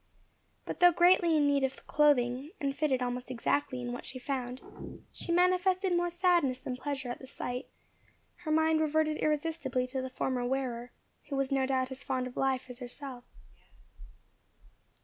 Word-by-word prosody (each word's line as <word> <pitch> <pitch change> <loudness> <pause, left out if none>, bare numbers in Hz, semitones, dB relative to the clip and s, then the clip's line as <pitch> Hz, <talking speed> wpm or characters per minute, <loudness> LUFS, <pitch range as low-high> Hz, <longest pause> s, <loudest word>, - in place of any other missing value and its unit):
But - - -5
though 355 0 +8
greatly 345 -1 +5
in 295 - +4
need 280 -1 +2
of 265 0 -2
clothing, 275 -2 +2
and 275 -1 -1
fitted 280 -4 +1
almost 245 0 -3
exactly 255 +2 0
in 245 0 -4
what 245 - -6
she 260 - -7
found, 255 -1 -3 0.5
she - - -4
manifested 365 +1 +3
more 350 0 +1
sadness 345 -7 +2
than 255 - -4
pleasure 270 -1 -3
at - - -6
the 260 - -11
sight; 250 -1 -5 0.7
her 345 -3 -7
mind 315 0 +3
reverted 310 0 +1
irresistibly 295 -4 0
to 260 +1 -3
the 260 - -4
former 255 -1 -1
wearer, 245 -2 -2 0.4
who 280 - -2
was 275 0 0
no 265 -1 +2
doubt 260 -1 0
as 265 +1 -7
fond 260 -1 -1
of 250 - -8
life 265 -1 0
as 250 -1 -10
herself. 250 0 -8
270 Hz, 170 wpm, -31 LUFS, 255-310 Hz, 0.7 s, though